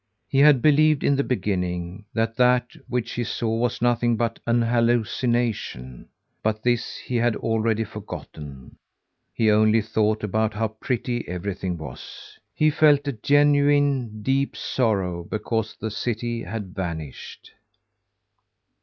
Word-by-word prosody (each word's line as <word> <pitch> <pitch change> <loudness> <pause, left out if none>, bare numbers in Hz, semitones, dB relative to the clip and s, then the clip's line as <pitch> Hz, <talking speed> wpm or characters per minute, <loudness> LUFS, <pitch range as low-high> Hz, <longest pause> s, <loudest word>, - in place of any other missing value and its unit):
He 135 - +1
had 145 -3 +6
believed 155 0 +4
in 140 - +3
the 140 - +1
beginning, 90 -4 -2
that 115 0 -1
that 125 0 +3 0.2
which 120 -1 -2
he 120 - -2
saw 115 0 -2
was 120 +1 -1
nothing 120 -1 +2
but 115 0 -1
an 120 0 +3
hallucination, 115 - -1 0.3
but 110 0 -1
this 120 -1 0
he 125 - -3
had 120 -1 +2
already 115 0 0
forgotten. 75 - -9 0.5
He 110 -2 +2
only 110 +1 +4
thought 110 0 0
about 110 +1 0
how 110 +1 0
pretty 120 +2 -3
everything 90 0 -4
was. 75 -6 -10 0.2
He 155 0 +3
felt 145 -2 +4
a 140 - 0
genuine, 145 -3 +2
deep 135 +2 0
sorrow 95 -8 -1
because 110 +3 -3
the 110 - -5
city 120 +1 -3
had 100 -2 -6
vanished. 80 -6 -6
115 Hz, 130 wpm, -24 LUFS, 105-125 Hz, 0.5 s, had